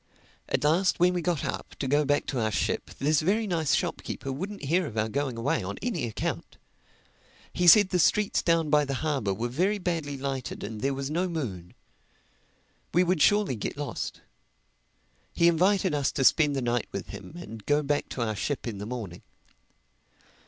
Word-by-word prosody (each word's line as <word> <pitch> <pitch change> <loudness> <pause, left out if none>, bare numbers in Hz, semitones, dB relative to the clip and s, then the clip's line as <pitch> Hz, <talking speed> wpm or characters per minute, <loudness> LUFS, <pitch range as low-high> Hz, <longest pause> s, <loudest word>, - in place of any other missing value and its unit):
At - - 0
last 170 +6 +2
when 180 +1 +4
we 175 - -1
got 170 -3 -1
up - - -5
to 135 - -3
go 145 +2 +2
back 145 +1 +1
to 130 - -2
our 110 -1 +1
ship, - - -1
this 150 +2 +2
very 210 +7 +1
nice 165 -7 +1
shopkeeper 135 - -3
wouldn't 190 +9 -5
hear 170 +4 +1
of 110 - -8
our 110 0 +1
going 130 +1 -2
away 115 +4 0
on 100 +2 -5
any 175 - -1
account. 110 - -4 1.0
He 180 - +1
said 205 +2 +8
the 180 - +1
streets 210 +4 +3
down 165 -3 +1
by 150 -1 +5
the 135 -1 -3
harbor 135 -10 0
were 110 +5 -2
very 180 - 0
badly 165 -7 -2
lighted 135 -2 -4
and 105 0 -6
there 135 0 0
was 135 +1 -4
no 180 +3 0
moon. 100 - -5 1.2
We 180 - +6
would 180 -3 +1
surely 205 -6 +4
get 110 - -5
lost. 145 -1 -5 1.1
He 170 - +4
invited 185 +1 +3
us 145 -2 +1
to 135 - 0
spend 145 +1 +4
the 135 - -1
night 120 -1 0
with - - -5
him - - -9
and 115 -12 -9
go 150 +1 +3
back 145 0 -1
to 125 - -2
our 110 -2 -2
ship 140 +6 -3
in 105 -4 -5
the 105 - -5
morning. 110 -8 -6
145 Hz, 190 wpm, -27 LUFS, 125-175 Hz, 1.2 s, said